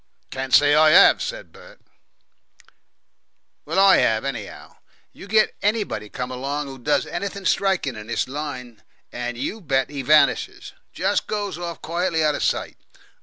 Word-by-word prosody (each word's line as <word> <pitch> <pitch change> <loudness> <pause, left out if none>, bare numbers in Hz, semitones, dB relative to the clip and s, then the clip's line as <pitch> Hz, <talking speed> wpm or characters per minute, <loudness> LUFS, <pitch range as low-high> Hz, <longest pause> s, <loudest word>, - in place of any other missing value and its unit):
"Can't 130 0 -5
say 145 +3 +5
I 155 +2 +7
'ave," - - -8
said - - -6
Bert. - - -16 1.9
"Well, - - -4
I 195 0 +6
'ave, 110 +4 0
anyhow. 120 -7 -8 0.4
You - - -12
get 215 +1 +2
anybody 205 - -2
come 125 +3 -5
along 140 +4 -4
who 135 -1 -10
does 145 +5 0
anything 200 +2 -5
striking 190 -12 0
in 105 0 -9
this 120 - -2
line, 130 -5 -7 0.3
and, 120 0 -5
you 175 - -4
bet, 135 -5 -1
he 140 -2 -4
vanishes. 150 +4 +2 0.2
Just - - -1
goes 205 -5 -4
off 170 -1 -7
quietly 170 -1 -1
out 150 -1 +2
of - - -4
sight. - - -2
150 Hz, 155 wpm, -22 LUFS, 130-185 Hz, 1.9 s, I